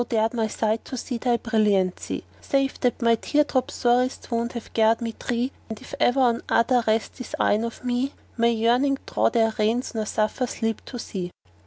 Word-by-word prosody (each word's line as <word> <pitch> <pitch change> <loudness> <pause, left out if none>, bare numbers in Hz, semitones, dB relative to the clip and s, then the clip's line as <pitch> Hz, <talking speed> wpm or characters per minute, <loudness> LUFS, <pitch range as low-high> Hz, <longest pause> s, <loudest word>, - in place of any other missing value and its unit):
nor - - -1
dared 225 0 +1
my 225 -2 0
sight 220 +1 -1
to 260 - -6
see 245 0 -4
thy 240 -1 +2
brilliancy: 210 -6 0 0.2
Save 275 -1 0
that 245 -1 0
my 230 0 +5
tear 295 +6 +2
drops 265 -1 -1
sorest 250 +1 +1
wound 235 +1 -1
have 235 -2 -8
garred 225 0 +4
me 230 -1 -3
dree 240 - -2
* - - 0
Yea! 255 +3 0 0.2
and 220 -1 -6
if - - -13
e'er 245 - +4
on 245 -3 +3
other 240 +1 +3
rest 220 -1 0
these 250 - -6
eyne 210 +2 +3
of 230 +1 -6
me, 250 +2 0 0.2
May 235 0 +3
yearning 245 +5 +2
draw - - +2
their 225 -2 +2
reins 225 +4 +1
nor 220 -2 -2
suffer 215 +5 0
sleep 225 -1 -2
to 250 - -7
see." 185 -6 -5
235 Hz, 210 wpm, -24 LUFS, 220-250 Hz, 0.2 s, my